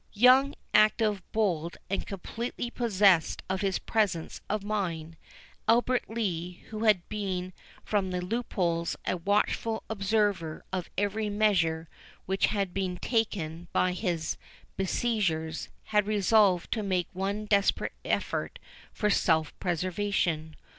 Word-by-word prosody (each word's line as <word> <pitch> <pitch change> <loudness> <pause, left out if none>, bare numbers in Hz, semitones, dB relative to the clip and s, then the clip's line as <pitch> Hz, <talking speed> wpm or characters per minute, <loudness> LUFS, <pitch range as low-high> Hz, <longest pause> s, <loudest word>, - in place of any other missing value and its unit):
Young, 255 +5 +6 0.2
active, 215 -1 +4
bold, 175 -7 0
and 195 - -2
completely 235 +5 -4
possessed 200 -9 +3
of 190 0 -1
his 195 -2 +1
presence 200 -7 -1
of 210 -1 -1
mind, 170 -6 -2 0.5
Albert 245 +2 +3
Lee, 180 -6 -3
who 215 +1 -3
had 205 -5 +4
been 185 -3 -3 0.3
from 200 -3 0
the 180 0 -2
loopholes 180 -4 -1
a - - +1
watchful 210 +4 0
observer 200 -6 0
of 185 -2 -2
every 205 +2 0
measure 180 -6 +2 0.4
which 190 +1 +2
had 200 -4 -1
been 185 -2 -2
taken 175 -8 -1
by 185 - +3
his 175 -4 -2 0.4
besiegers, 185 -6 -1
had 210 -1 +1
resolved 205 -3 +3
to 220 - 0
make 185 -4 0
one 200 +3 -2
desperate 200 -1 +2
effort - - -1 0.3
for 210 -1 0
self 160 -5 +2
preservation. 175 -3 -1
195 Hz, 120 wpm, -29 LUFS, 175-215 Hz, 0.5 s, Young